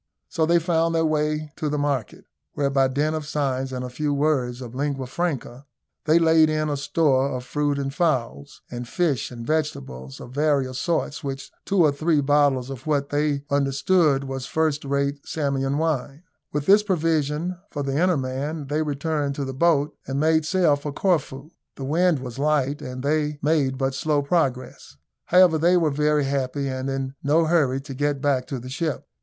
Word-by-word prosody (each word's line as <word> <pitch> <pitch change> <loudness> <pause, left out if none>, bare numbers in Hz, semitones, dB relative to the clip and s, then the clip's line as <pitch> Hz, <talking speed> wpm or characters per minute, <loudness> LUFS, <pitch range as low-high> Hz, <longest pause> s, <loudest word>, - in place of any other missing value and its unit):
So 160 -3 0
they 170 +1 +4
found 165 -1 +1
their 160 0 +2
way 155 0 -1
to 155 - -2
the 150 - -1
market, 140 -6 -2 0.3
where 140 -1 0
by 135 -1 +3
dint 145 +4 0
of 155 -2 -4
signs 135 -3 -1
and 125 -1 -4
a - - -5
few 145 +3 -1
words 135 -4 0
of 125 -2 -8
lingua 135 0 -2
franca, 140 -3 -4 0.4
they 155 +2 +5
laid 160 -1 +5
in 155 0 0
a 145 - 0
store 140 -2 +2
of 125 -2 -4
fruit 145 +2 -1
and 135 -1 -3
fowls, 130 - -2
and 120 0 -6
fish 150 - 0
and 120 -2 -8
vegetables 140 - -3
of 120 - -10
various 140 -3 +1
sorts, 160 -4 -1
with 135 -1 -5
two 195 -3 +3
or 150 - +4
three 155 +2 +1
bottles 140 -2 +2
of 135 +2 -9
what 140 -2 0
they 145 -1 0
understood 140 +2 +2
was 135 -1 -5
first 155 -1 0
rate 140 0 -1
Samian 140 -2 -1
wine. 155 -1 -2 0.3
With 145 0 -2
this 205 +4 +6
provision 165 -2 -1
for 145 - -4
the 135 +1 -1
inner 180 -2 +3
man 140 +4 -3
they 150 +2 0
returned 145 -1 -1
to 140 - -3
the 135 - -5
boat, 150 0 +2
and 135 +1 -2
made 160 0 +3
sail 175 -4 +3
for 145 +1 -5
Corfu. 150 -3 -1 0.2
The 135 - -6
wind 170 +3 +2
was 130 0 -7
light, 145 -1 +1
and 130 -2 -6
they 150 0 0
made 145 -4 +1
but 135 0 0
slow 150 0 0
progress. 135 - -2 0.3
However, 180 -3 +5
they 175 +3 +4
were 160 -3 +2
very 150 +1 +2
happy, 135 0 -1
and 130 0 -3
in 135 0 -3
no 155 +3 +3
hurry 150 -6 +2
to 135 0 -8
get 145 +1 -1
back 135 -3 0
to 135 - -4
the 125 +1 -8
ship. 150 +2 -3
145 Hz, 190 wpm, -24 LUFS, 135-155 Hz, 0.4 s, this